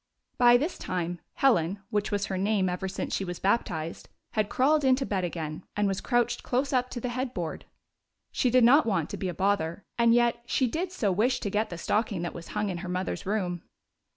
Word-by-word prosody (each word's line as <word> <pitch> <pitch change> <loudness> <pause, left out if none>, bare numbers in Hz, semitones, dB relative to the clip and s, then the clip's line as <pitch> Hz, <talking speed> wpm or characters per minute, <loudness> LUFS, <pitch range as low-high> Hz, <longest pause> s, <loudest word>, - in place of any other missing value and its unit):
By 240 -1 +7
this 305 +8 -3
time 175 -1 -3 0.2
Helen 200 -6 +2
— - - -45
which 210 -1 0
was 205 -1 0
her 195 - -3
name 195 -1 +1
ever 180 +2 -3
since 190 - -4
she - - 0
was 175 -2 -5
baptized 175 -6 -1
— - - -53
had 215 -1 0
crawled 295 +3 +3
into 265 0 +3
bed 195 -5 -1
again, 160 -1 -4
and 205 0 +2
was 195 -1 -1
crouched 240 -1 +1
close 265 +3 -1
up 250 -1 +1
to 245 - -5
the 250 - -3
headboard. 240 -10 -4 0.7
She 255 - +1
did 250 0 +5
not 260 +4 +6
want 185 -8 0
to - - -4
be 190 - -2
a - - -3
bother, 190 -1 0
and 235 0 +5
yet 240 0 +2
she 260 - +2
did 340 +9 -2
so 215 - 0
wish 230 +7 +2
to 200 - -2
get 215 +2 0
the 175 - -6
stocking 205 0 -1
that 175 - -3
was 170 - -9
hung 210 - 0
in 175 -2 -3
her 185 0 -6
mother's 185 +1 -3
room. 180 -4 -1
205 Hz, 225 wpm, -28 LUFS, 180-245 Hz, 0.7 s, By